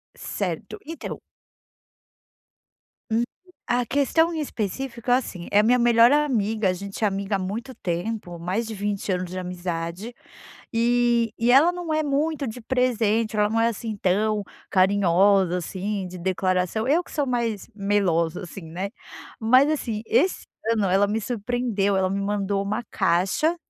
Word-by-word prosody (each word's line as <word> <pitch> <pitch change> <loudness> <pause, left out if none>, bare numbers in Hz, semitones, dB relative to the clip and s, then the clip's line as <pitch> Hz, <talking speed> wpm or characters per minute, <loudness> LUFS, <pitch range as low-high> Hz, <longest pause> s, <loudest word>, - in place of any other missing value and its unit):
Certo, - - -4
então 330 +1 -6 1.9
Hum, 230 +2 +2 0.4
a 245 0 +1
questão 285 +5 +2
em 320 - -3
específico 240 -1 -4
é 245 - +6
assim: 185 -9 -4
é 205 - +5
a - - +5
minha 245 +3 +4
melhor 235 0 +6
amiga, 225 -9 +2
a - - +2
gente 200 +4 -6
é - - +5
amiga 195 0 -1
há - - -6
muito 220 +8 -4
tempo, 180 -2 -4
mais 185 +7 -2
de 220 - -5
20 205 0 -2
anos 180 -1 -2
de 185 - -4
amizade 180 +3 -4 0.6
e 235 0 +2
e 230 +1 +2
ela 290 +7 +6
não 350 -3 -4
é 310 0 +1
muito 295 +1 0
de 225 +2 -6
presente, 230 -3 +1
ela 210 0 +3
não 225 +1 +1
é, 230 - +4
assim, 225 0 -4
tão 205 +3 +1 0.3
carinhosa, 190 -1 +3
assim, 190 +3 -3
de 180 0 -9
declaração. 185 +3 0
Eu 310 +6 +3
que - - -16
sou 290 - 0
mais 235 -5 -2
melosa, 195 -5 +1
assim, 180 +1 -9
né, 185 +4 -4 0.5
mas 255 +5 +5
assim, 230 -8 -2
esse 370 - +1 0.3
ano 215 -3 +1
ela 195 +2 +3
me 215 +2 -1
surpreendeu, 225 -3 -1
ela 190 -1 +2
me 195 +1 -1
mandou 200 0 -1
uma 215 +4 -2
caixa, 190 - +2
210 Hz, 160 wpm, -24 LUFS, 190-245 Hz, 1.9 s, é